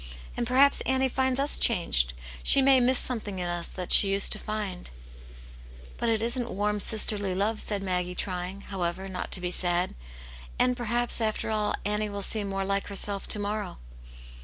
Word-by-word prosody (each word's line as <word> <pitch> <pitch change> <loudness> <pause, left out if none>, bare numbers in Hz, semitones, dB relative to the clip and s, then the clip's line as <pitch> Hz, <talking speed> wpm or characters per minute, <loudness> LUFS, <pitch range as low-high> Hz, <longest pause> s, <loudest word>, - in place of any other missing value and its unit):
" 60 - -17
And 240 - -3
perhaps 270 +3 +3
Annie 265 0 0
flnds 260 0 0
us 280 +2 +2
changed; 65 - +2 0.3
she - - +6
may 270 -1 +5
miss 250 +1 +3
something 215 -6 -1
in 180 -1 -3
us 175 0 0
that 180 -2 -7
she 200 - +9
used 195 0 +1
to 215 - +1
find." 210 -4 -6 1.1
"But 235 - -1
it 225 -1 0
isn't 240 +1 -2
warm, 210 +1 -2
sisterly 205 -2 +1
love," 210 +3 -1
said 205 -2 -3
Maggie, 180 -1 -2
trying, 185 +1 -4
however, 190 -1 -4
not 185 -1 -6
to - - +1
be 180 0 -4
sad. 175 0 0 0.6
"And 250 0 +1
perhaps, 240 0 0
after 220 0 -2
all, 210 -1 -1
Annie 210 +1 -1
will 200 -1 -5
seem 205 0 -1
more 195 0 -3
like 195 0 -2
herself 200 0 -1
to - - +5
morrow." 205 0 -4
205 Hz, 185 wpm, -26 LUFS, 190-235 Hz, 1.1 s, she